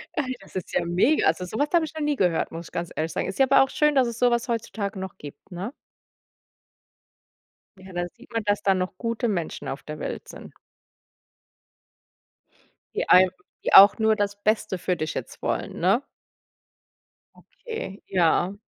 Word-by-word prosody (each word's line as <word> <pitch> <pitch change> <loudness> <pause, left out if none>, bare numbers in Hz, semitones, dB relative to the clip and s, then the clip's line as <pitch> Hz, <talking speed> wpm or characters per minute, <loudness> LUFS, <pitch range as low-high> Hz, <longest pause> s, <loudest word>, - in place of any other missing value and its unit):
Ey, 255 -4 -2
das - - -17
ist 185 - -5
ja - - +1
mega. 185 - +2
Also 165 +3 +1
so 200 - -6
was 290 - +1
habe 335 -2 +4
ich 310 - -10
noch 315 - -5
nie 295 -1 +1
gehört, 175 -8 +1
muss 165 0 -7
ich - - -16
ganz 170 0 -4
ehrlich 160 +1 -2
sagen. - - -2
Ist 190 - -6
ja 270 - +6
aber 270 0 +6
auch 270 - -3
schön, 300 -1 +2
dass 255 -2 +4
es 235 0 -5
so 245 -1 +4
was 235 +1 0
heutzutage 215 -3 -3
noch 190 -1 -7
gibt, 145 +6 -12
ne? 195 +9 -5 2.1
Ja, 190 -1 -12
dann 175 0 -2
sieht 245 +1 -18
man, 225 -2 -1
dass 205 0 0
da 195 - +4
noch 185 0 -3
gute 230 +1 -2
Menschen 175 -6 -3
auf 135 - -5
der 150 0 -7
Welt - - -5
sind - - -11 2.4
die - - -1
einem 185 0 +7 0.3
die - - 0
auch 200 +3 +10
nur 220 -1 +3
das 205 -1 -2
Beste 215 -3 +1
für 180 +1 -1
dich 155 0 -3
jetzt - - -7
wollen, - - -3
ne? - - +3 1.6
Okay, 220 - -5
ja. 180 +1 +2
200 Hz, 185 wpm, -25 LUFS, 180-240 Hz, 2.4 s, auch